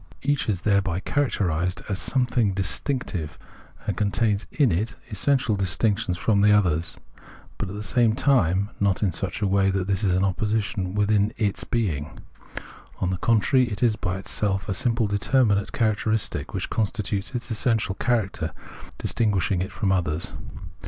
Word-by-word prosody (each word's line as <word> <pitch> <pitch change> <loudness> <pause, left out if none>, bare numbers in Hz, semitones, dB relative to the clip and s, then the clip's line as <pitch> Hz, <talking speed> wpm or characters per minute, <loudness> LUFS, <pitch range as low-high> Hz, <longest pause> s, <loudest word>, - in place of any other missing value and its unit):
Each, 145 0 0
however, - - +3
is 90 - -6
thereby 100 -3 +1
characterised 90 - 0
as 100 -2 -2
a - - -2
something 125 -5 +1
dis 95 0 +2
tinctive, 95 - -3 0.5
and - - -1
contains 105 0 0
in 140 -8 +3
it 105 +8 -1 0.2
essential 120 +2 +1
distinction 100 +1 0
from 100 +3 +1
the 105 +1 +5
others; 85 -5 +2 0.6
but - - -3
at 100 - -6
the 105 - -5
same 115 0 +3
time 100 - +2
not 100 0 +1
in 95 - +2
such 95 +4 -3
a - - +2
way 95 0 +3
that 95 -1 0
this 100 0 -1
is 95 -3 +2
an 95 - +2
opposition 100 -1 -1
within 105 +1 +2
its 105 -3 -1
being; 80 - -2 0.8
on 95 - 0
the 95 - -1
con 115 +5 +3
trary, 130 0 +2
it 105 - -3
is 115 -3 +3
by 90 -2 -3
itself 95 0 -1
a 100 - -1
simple 115 +3 +1
determinate 100 0 +2
characteristic 110 -1 0
which - - -4
constitutes 105 0 -2
its 120 0 -4
essential 110 -2 +1
character, 100 - -1 0.4
distinguishing 100 -5 0
it 95 - -3
from 100 -4 -1
others. 85 -3 -1
100 Hz, 165 wpm, -24 LUFS, 95-115 Hz, 0.8 s, the